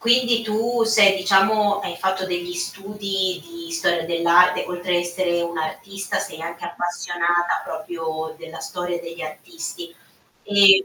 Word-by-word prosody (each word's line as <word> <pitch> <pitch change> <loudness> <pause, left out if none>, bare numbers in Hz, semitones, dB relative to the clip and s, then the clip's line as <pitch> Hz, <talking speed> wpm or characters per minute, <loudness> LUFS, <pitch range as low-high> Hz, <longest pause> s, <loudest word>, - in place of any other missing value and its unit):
Quindi 240 0 +4
tu 225 +2 0
sei 215 -3 +6
diciamo, 200 +2 +3
hai - - -5
fatto 190 0 -1
degli 175 -1 -3
studi 195 0 -2
di 335 0 -10
storia 175 - +1
dell'arte, 170 +2 +4
oltre 180 0 -1
a - - +4
essere 175 0 0
un'artista, 170 +4 -3
sei 160 - -6
anche 170 0 -6
appassionata 175 0 -1
proprio 160 -4 -5
della 165 0 -9
storia 175 -1 -4
degli 170 0 -8
artisti. 170 - -7 0.5
Ehm, 200 -1 +7
180 Hz, 135 wpm, -22 LUFS, 170-205 Hz, 0.5 s, Ehm